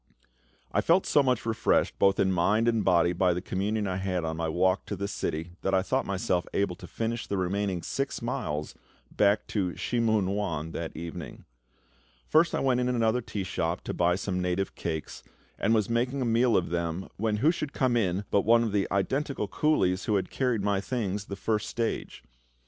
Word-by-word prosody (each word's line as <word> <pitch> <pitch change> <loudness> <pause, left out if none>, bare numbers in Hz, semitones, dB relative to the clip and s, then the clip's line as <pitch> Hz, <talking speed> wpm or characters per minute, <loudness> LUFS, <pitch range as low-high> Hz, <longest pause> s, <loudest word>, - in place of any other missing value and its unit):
I - - +2
felt 175 +3 +3
so 145 - +4
much 125 -4 0
refreshed 115 -1 +1
both 95 0 +4
in 95 - +3
mind 105 +6 +2
and 115 -3 +2
body 85 -1 +3
by 90 -1 +2
the - - -1
communion 100 +3 -1
I 95 -2 -2
had 95 -3 -1
on 80 0 -2
my 80 0 -2
walk 90 +3 +1
to 100 - -3
the 100 +1 -3
city 85 -3 -3
that 95 - +1
I 95 - +3
thought 130 +6 0
myself 95 -2 0
able 100 -3 +1
to - - -10
finish 115 +1 -3
the 100 - -2
remaining 95 -1 -1
six 135 +10 -2
miles 75 -11 -3 0.4
back 105 0 +2
to 90 -6 -1
Shih 120 - -1
mun 110 -4 +2
wan 85 -6 -2
that 80 -1 -5
evening. 85 0 -7 0.8
First 165 +2 +4
I - - 0
went 130 -2 +2
into 125 0 +1
another 115 +1 +2
tea 105 -3 -4
shop 85 -1 -2
to - - -5
buy 90 0 +2
some 90 -1 -2
native 90 +2 -1
cakes, 80 -2 -5 0.4
and - - +1
was 110 -3 +3
making 125 +3 0
a - - -1
meal 115 0 +3
of 85 -2 -1
them 85 +1 -2
when 110 0 0
who 150 +9 +4
should 150 -4 -4
come 130 -3 +1
in 100 -4 +1
but 100 - +4
one 115 +3 +4
of 110 - -1
the 100 -1 +1
identical 130 +4 -1
coolies 95 -6 +1
who 105 - +1
had 95 -2 -1
carried 125 -6 0
my 100 -1 +1
things 105 -4 -2
the 100 - -6
first 105 +1 -1
stage. 115 -1 -3
100 Hz, 205 wpm, -28 LUFS, 90-115 Hz, 0.8 s, so